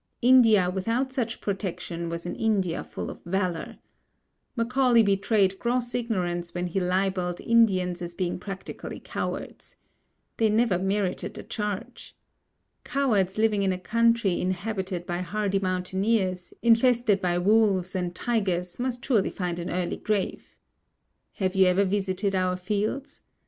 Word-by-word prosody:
India 230 -7 +6
without 230 +8 -1
such 235 -3 -2
protection 180 -4 -4
was 170 0 -5
an 175 - -4
India 195 -6 0
full - - -6
of - - -12
valour. 180 -1 -2 0.8
Macaulay 245 0 +3
betrayed 195 -1 +2
gross 240 0 -1
ignorance 180 -8 -2
when 175 0 -1
he 180 +2 -1
libelled 180 -1 0
Indians 185 -6 +2
as 170 0 -6
being 180 -1 -2
practically 195 +1 -7
cowards. - - -5 0.6
They 220 -1 +3
never 215 -4 +2
merited 190 0 -1
the - - -7
charge. 210 -3 -5 0.7
Cowards 215 -9 +1
living 215 -2 +2
in 195 -1 +2
a 185 - -1
country 230 -1 +2
inhabited 185 -1 -3
by 175 0 -3
hardy 195 +2 -1
mountaineers, 185 0 -1
infested 235 -3 +4
by 175 -1 +1
wolves 195 -1 +3
and 180 -2 -2
tigers 185 -6 -1
must 245 -1 -3
surely 220 -8 +2
find 175 -2 -3
an 170 - -4
early 180 -1 -2
grave. 210 -3 -2 0.8
Have 190 -1 -2
you 190 -1 +5
ever 185 +2 +3
visited 195 0 -1
our 185 -1 +1
fields? 215 +9 -3
195 Hz, 135 wpm, -26 LUFS, 180-225 Hz, 0.8 s, India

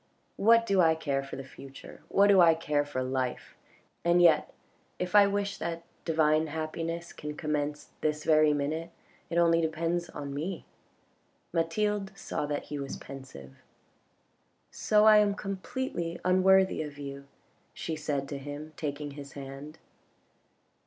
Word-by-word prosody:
What 230 +2 +5
do 195 -4 +3
I 160 -1 +4
care 140 -4 -1
for 135 - -8
the 135 - -6
future, 135 0 -12
what 200 - +4
do 200 -2 +6
I 165 -2 +6
care 150 -2 0
for 145 -3 -3
life? 130 -1 -3 0.5
And 175 +1 +4
yet 165 -3 +5 0.5
if 180 0 -4
I 205 -1 +7
wish 200 0 -2
that 170 0 -4 0.2
divine 155 -1 +2
happiness 165 +2 -4
can 150 0 -7
commence 150 -1 -2
this 150 0 -1
very 155 -1 +5
minute, 150 +3 -2 0.4
it 170 - -2
only 170 -1 +4
depends 165 +2 -1
on 140 -1 -6
me." 165 +5 -4 0.9
Mathild 195 +4 -1
saw 150 - -3
that 145 0 -2
he 145 - -3
was 140 -1 -5
pensive. 130 - -11 0.6
" - - -43 0.2
So 210 0 +6
I 215 -1 +8
am 205 -1 +3
completely 195 -3 -4
unworthy 190 0 +4
of 150 -2 -7
you," 140 -1 -8 0.4
she 160 - -4
said 145 -3 -2
to 140 - -4
him, 145 +2 -8
taking 145 -1 -4
his 140 0 -10
hand. 140 +3 -9
160 Hz, 150 wpm, -29 LUFS, 145-180 Hz, 0.9 s, I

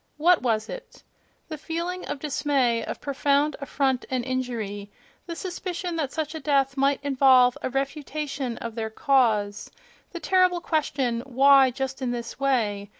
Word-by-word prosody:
what 345 +3 +4
was 225 -3 0
it?"—The 330 - -12
feeling 340 +4 -4
of - - -3
dis 290 0 -4
may, 250 -6 +2
of - - -6
profound 285 +1 +1
affront 270 -2 0
and 255 -2 -2
injury; 230 -6 -4 0.4
the 335 - -5
suspicion 360 -1 -4
that 290 -4 -2
such 310 -1 -3
a 320 - -5
death 275 -2 +1
might 275 0 +2
involve 260 -3 +5
a - - -2
refutation 275 -1 -3
of 230 -1 -6
their 220 -1 -3
cause; 220 -5 +1 0.4
the 345 - -6
terrible 365 +1 +3
question, 270 -8 -1
"Why 270 +1 +6
just 265 +1 -4
in 255 - -1
this 240 +1 -5
way?" 215 -7 0
275 Hz, 150 wpm, -25 LUFS, 245-300 Hz, 0.4 s, Why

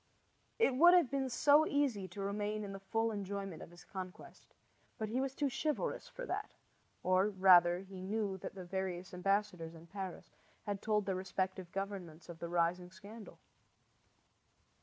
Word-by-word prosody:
It 360 - +3
would 345 +6 +8
have 340 -8 +4
been 270 -1 0
so 295 +5 +5
easy 260 -10 +1
to 185 +3 -8
remain 210 +2 -2
in 200 -1 -6
the 195 - -6
full 225 +3 0
enjoyment 200 -3 -4
of - - -9
his 175 +1 -15
conquest; 185 -2 -9 0.4
but 215 -1 -3
he 250 +4 0
was 270 0 -2
too 290 - +1
chivalrous 285 +3 -2
for - - -7
that, - - -4 0.5
or, 185 +2 +4
rather, 180 -3 +6
he 190 -1 -9
knew 200 0 -1
that - - -7
the 185 -2 -7
various 185 0 -3
ambassadors 180 -3 0
in 165 0 -12
Paris 190 0 -7 0.3
had 205 -2 -3
told 210 -2 +1
their 190 - 0
respective 185 -1 -3
governments 190 -5 -5
of 170 -1 -8
the 170 - -5
rising 175 +1 +1
scandal. 200 +5 -11
195 Hz, 165 wpm, -35 LUFS, 180-220 Hz, 0.5 s, would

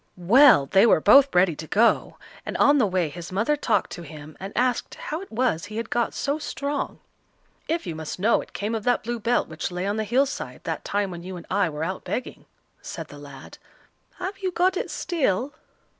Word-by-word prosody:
Well! 210 - +6
they 195 +10 +4
were 215 - +5
both 275 - +6
ready 180 -2 +4
to 160 - -8
go, 230 +7 +2 0.3
and - - -4
on 285 0 +5
the 225 - +3
way 185 -3 0
his 170 +4 -8
mother 220 +10 +1
talked 290 - 0
to - - -7
him, 155 -2 -11
and 195 +1 -6
asked 250 -1 0
how 315 +3 -5
it 390 - -11
was 225 -8 0
he 215 +1 -8
had 230 0 -4
got 240 -1 0
so 285 +2 -1
strong. 285 -1 -3 0.7
"If 330 -3 -1
you 170 - -4
must 160 -1 -6
know 210 +5 +2
it - - -13
came 210 +3 -3
of 220 -2 -2
that 245 0 +2
blue 240 +1 -3
belt 235 +3 +1
which 155 +3 -4
lay 180 +1 -4
on 205 +2 -1
the 220 - 0
hill 250 +6 +2
side 275 - -6
that - - -4
time 200 -1 -1
when 170 -1 -7
you 185 +1 -7
and 170 - -10
I 195 -2 +2
were 150 0 -4
out 185 +3 -4
begging," 255 - -5 0.4
said - - -7
the - - -11
lad. - - -12 0.6
"Have 380 +2 -5
you 380 -1 -1
got 365 +2 +2
it - - -3
still?" 280 - -1
215 Hz, 220 wpm, -24 LUFS, 180-275 Hz, 0.7 s, Well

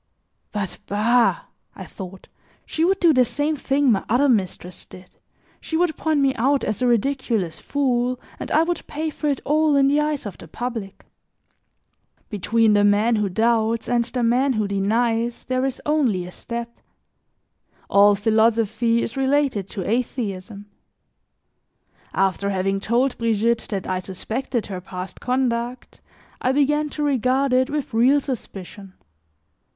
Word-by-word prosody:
"But, 200 -3 -4
bah," 235 - +2 0.3
I - - -8
thought, 190 -1 -10 0.4
"she 320 - -2
would 385 +3 +2
do 335 -3 +5
the 255 -2 +5
same 290 +5 -1
thing 275 -1 +1
my 195 - +1
other 250 +6 +3
mistress 185 -6 -1
did, 185 0 -15 0.4
she 320 - -3
would 340 -2 +1
point 310 -3 0
me 270 -1 +3
out 270 +4 +2
as 215 +3 -2
a 250 - +3
ridiculous 235 - 0
fool, 250 -3 0 0.2
and - - -6
I 315 - +4
would 345 0 -3
pay 310 +1 -3
for 300 - -4
it 280 -2 0
all 305 0 +3
in 275 -1 +4
the 290 +2 +3
eyes 300 -3 -1
of 200 -4 -7
the - - -11
public." 225 0 -6 1.3
Between 220 +2 +2
the 205 0 +4
man 210 +3 +3
who 210 -2 0
doubts 225 +2 +1
and 240 -1 +2
the 250 0 -3
man 255 +4 +2
who 215 -3 0
denies, 225 +4 0
there 255 0 -1
is 265 -1 -3
only 260 -12 +1
a 180 - -9
step. 235 +3 -7 1.1
All 205 +1 +5
philosophy 225 +2 +2
is 230 - -5
related 270 -7 +1
to 195 -2 -5
atheism. 210 -4 -3 1.5
After 195 +1 0
having 195 0 0
told 240 +6 0
Brigitte 230 0 +1
that 195 -3 -3
I 185 0 -1
suspected 220 +6 -4
her 185 -3 -6
past 185 0 -8
conduct, 250 -1 -2 0.4
I 255 - +1
began 295 +2 +2
to 300 - -4
regard 265 -1 +1
it 260 +2 +3
with 290 -4 -3
real 255 +6 +4
suspicion. 200 -7 -7
235 Hz, 150 wpm, -22 LUFS, 205-270 Hz, 1.5 s, do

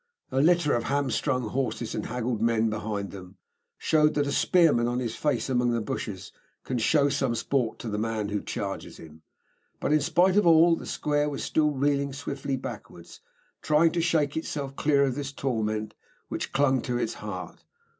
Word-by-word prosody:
A 135 - +2
litter 170 -1 +3
of 120 -1 0
hamstrung 130 -3 0
horses, 125 -2 -2
and - - -3
haggled 120 -1 -2
men 115 -1 +2
behind 105 -2 -3
them, 95 -1 -11 0.4
showed 150 -1 +2
that 145 -1 +2
a 140 - -2
spearman 155 -9 +3
on 120 +1 -1
his 120 -3 -2
face 145 -6 0
among 125 -2 +1
the 115 - +1
bushes 105 -3 -5 0.3
can 125 - -2
show 140 +5 +3
some 135 -4 0
sport 115 0 -1
to - - -7
the 105 -1 -2
man 110 -2 -2
who 105 0 -2
charges 100 -1 -5
him. 80 -1 -13 0.6
But, - - 0
in 155 - +4
spite 180 +6 +3
of 205 -4 +4
all, 165 +1 +6
the - - -9
square 150 0 0
was 140 - -4
still 150 -1 +2
reeling 140 0 0
swiftly 140 -1 -4
backwards, - - -9 0.4
trying 155 +2 +3
to 170 - 0
shake 160 -4 +1
itself 140 -4 -4
clear 140 -1 +3
of 135 -2 +1
this 140 +1 -4
torment 110 -6 -2 0.4
which - - -4
clung 135 -2 +2
to 125 -1 -2
its - - -1
heart. - - -7
135 Hz, 185 wpm, -27 LUFS, 115-150 Hz, 0.6 s, all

